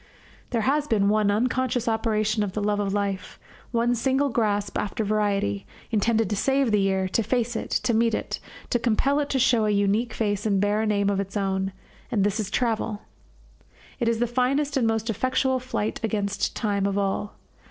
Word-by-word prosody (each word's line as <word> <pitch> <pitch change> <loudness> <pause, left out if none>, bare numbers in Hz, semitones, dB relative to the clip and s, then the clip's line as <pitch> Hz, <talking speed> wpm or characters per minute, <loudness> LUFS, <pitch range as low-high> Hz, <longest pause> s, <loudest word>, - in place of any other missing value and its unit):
There 235 -2 0
has 285 +5 +1
been 205 -5 +2
one 210 -1 +3
unconscious 245 +2 0
operation 215 -1 +1
of 200 -3 -2
the 210 - -2
love 205 0 +1
of 200 -1 -1
life, 200 -1 -2 0.3
one 235 0 +1
single 265 +4 +1
grasp 205 -4 0
after 210 +2 -2
variety, 200 - 0 0.2
intended 225 0 +2
to - - +1
save 270 +3 +2
the 210 - +3
year, 190 -1 +1
to 230 - +1
face 240 +1 -1
it, - - -3
to 240 - +1
meet 225 0 +3
it, - - -4 0.3
to 240 - +2
compel 255 +5 +2
it 290 -1 -1
to 270 - 0
show 240 -3 +3
a - - +1
unique 205 +3 +1
face 205 -2 -1
and 200 -2 +2
bear 205 +2 +1
a 220 - 0
name 200 -1 +2
of 195 - 0
its 195 +1 -3
own; 195 -1 -1 0.4
and 220 -6 +1
this 205 +1 0
is 205 -3 -2
travel. 220 -2 -1 1.0
It 240 - 0
is 230 0 +2
the 240 - +1
finest 265 +4 0
and 250 -4 +2
most 225 0 0
effectual 255 +4 +1
flight 245 -4 -3
against 205 -2 -1
time 200 -3 0
of 200 0 -1
all. 200 +1 -1
215 Hz, 195 wpm, -25 LUFS, 205-240 Hz, 1.0 s, one